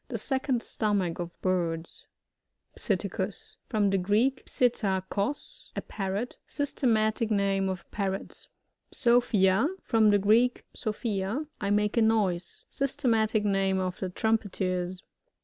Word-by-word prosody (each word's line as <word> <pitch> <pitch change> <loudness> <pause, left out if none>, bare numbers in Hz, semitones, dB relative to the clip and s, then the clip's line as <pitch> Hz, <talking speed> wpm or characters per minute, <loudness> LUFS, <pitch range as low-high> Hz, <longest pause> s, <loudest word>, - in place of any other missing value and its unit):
The - - -3
second 265 -3 -1
stomach 200 -6 -1
of 170 -1 -6
birds. 170 -3 -2 0.7
Psittauus. - - -2
— - - -54
From 210 -4 +2
the 195 - +2
Greek, 220 +8 +1
psUta^ 205 -6 +1
ko8, 285 - -3
a - - -2
Parrot. 200 +4 -4
Systematic 230 -6 +1
name 195 -2 +1
of 185 -1 -5
Parrots. 195 -2 -4 0.4
PsopHiA. 235 -3 +3
— - - -40
From 220 -2 +4
the 205 - +5
Greek, 225 +5 +3
psophia^ 215 +3 -2
I 200 - -2
make 210 +2 +1
a - - +5
noise. 200 -6 +1
Systematic 225 -6 +1
name 195 -1 +2
of 185 -1 -3
the 190 - -2
Trumpeters. 185 -3 -1
205 Hz, 130 wpm, -28 LUFS, 190-230 Hz, 0.7 s, the